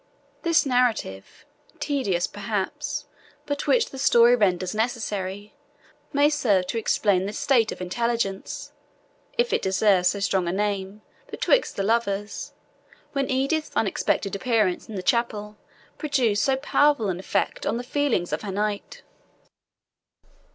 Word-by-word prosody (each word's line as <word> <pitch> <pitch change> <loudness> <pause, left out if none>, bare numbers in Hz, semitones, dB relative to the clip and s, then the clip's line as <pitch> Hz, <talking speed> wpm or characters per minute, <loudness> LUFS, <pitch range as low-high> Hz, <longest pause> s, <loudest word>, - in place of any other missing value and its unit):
This 335 -3 +3
narrative, 245 - -1 0.3
tedious 200 -12 0
perhaps, 285 +9 -3 0.4
but 285 -1 -3
which 475 -2 +3
the 270 - -8
story 240 -2 +6
renders 185 -5 +1
necessary, 210 -3 -3 0.6
may 285 +1 +4
serve 235 -11 +2
to 230 - -2
explain 195 -4 +1
the 205 - -5
state 230 -2 +2
of - - -7
intelligence, 200 +1 -2 0.7
if 480 0 +1
it - - +2
deserves 190 -1 +3
so 200 - +1
strong 190 -2 0
a - - 0
name, 200 +1 -2 0.3
betwixt - - +1
the 195 - -1
lovers, 205 -2 -1 0.6
when 275 -2 -1
Edith's 275 +4 0
unexpected 200 -1 0
appearance 215 -5 0
in 220 - -6
the 185 - -4
chapel 210 -2 -1 0.4
produced 250 -9 +1
so 270 - +3
powerful 285 -4 +2
an 180 -1 -2
effect 190 - -1
on 230 - 0
the 245 - -4
feelings 255 -9 0
of - - -1
her 205 - -5
knight. 210 - -3
215 Hz, 135 wpm, -25 LUFS, 195-265 Hz, 0.7 s, story